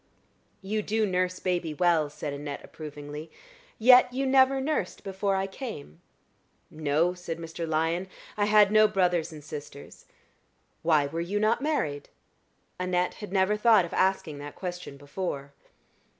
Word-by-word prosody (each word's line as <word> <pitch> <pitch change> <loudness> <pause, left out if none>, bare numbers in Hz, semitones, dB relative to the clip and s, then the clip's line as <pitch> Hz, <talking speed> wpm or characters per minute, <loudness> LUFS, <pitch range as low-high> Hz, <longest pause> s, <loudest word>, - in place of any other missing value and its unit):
"You 210 +2 -1
do 215 +1 0
nurse 185 -1 0
baby 175 -4 -1
well," 165 -2 +2
said 145 0 -5
Annette, 145 0 -6
approvingly. 150 0 -8 0.5
"Yet 250 +2 +7
you 265 +2 -1
never 265 0 +4
nursed 265 - -2
before 195 0 -1
I 190 0 0
came?" 195 - -8 0.7
"No," 155 +3 +1
said 175 -2 -6
Mr. 165 0 -6
Lyon. 165 +3 0 0.3
"I 205 - +1
had 210 -1 +5
no 215 0 +6
brothers 180 -5 +1
and 150 -2 -10
sisters." 145 -1 -10 0.7
"Why 155 -3 +3
were 165 +4 -3
you 195 +5 -2
not 215 +4 +2
married?" 155 - -2 0.7
Annette 180 0 0
had 210 - -7
never 190 +1 +2
thought 210 -3 +5
of 170 - -9
asking 185 -6 0
that 145 0 -8
question 180 -6 -6
before. 140 -1 -5
180 Hz, 145 wpm, -27 LUFS, 155-210 Hz, 0.7 s, Yet